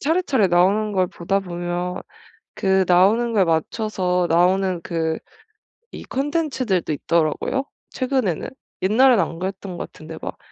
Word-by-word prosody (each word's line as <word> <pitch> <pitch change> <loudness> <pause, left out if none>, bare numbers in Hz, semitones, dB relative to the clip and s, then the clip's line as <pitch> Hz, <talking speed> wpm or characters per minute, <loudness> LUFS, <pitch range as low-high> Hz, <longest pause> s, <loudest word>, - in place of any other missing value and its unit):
차례차례 285 - +2
나오는 200 +5 +3
걸 185 -2 +2
보다 185 +3 -1
보면 175 0 -4 0.5
그 190 0 +2
나오는 205 +7 +4
거에 200 - +4
맞춰서 180 +2 0
나오는 180 +1 +2
그 160 -1 -2 0.7
이 - - -8
컨텐츠들도 265 - -1
있더라고요, 165 - 0 0.3
최근에는. 255 - -1 0.3
옛날엔 235 +6 +5
안 165 -1 -3
그랬던 190 -1 -5
것 - - -6
같은데 160 0 -10
막 - - -6
190 Hz, 295 characters per minute, -22 LUFS, 175-220 Hz, 0.7 s, 옛날엔